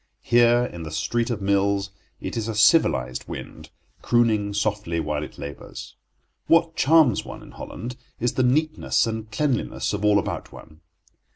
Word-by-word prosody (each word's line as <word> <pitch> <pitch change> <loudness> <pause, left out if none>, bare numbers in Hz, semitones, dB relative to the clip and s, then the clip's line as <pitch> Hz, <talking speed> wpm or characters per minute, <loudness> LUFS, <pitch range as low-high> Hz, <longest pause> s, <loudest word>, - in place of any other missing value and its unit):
Here, 120 0 +4
in 85 -7 -8
the 80 - -6
street 80 +11 -1
of 110 -4 -3
mills, 100 0 +1 0.3
it - - -5
is 115 -1 -2
a 110 - -3
civilized 105 - +3
wind, - - -8 0.3
crooning 110 -4 +2
softly 105 -5 -1
while 75 -1 -2
it 75 - -8
labours. 70 0 -9 0.5
What 165 0 +3
charms 150 -7 +4
one - - -9
in - - -13
Holland 125 +2 -8 0.2
is 120 0 0
the - - 0
neatness 155 +5 +1
and 110 -1 -4
cleanliness 135 -2 -1
of 105 0 -3
all 105 -1 +4
about 100 - -3
one. 80 0 -14
110 Hz, 160 wpm, -24 LUFS, 95-120 Hz, 0.5 s, Here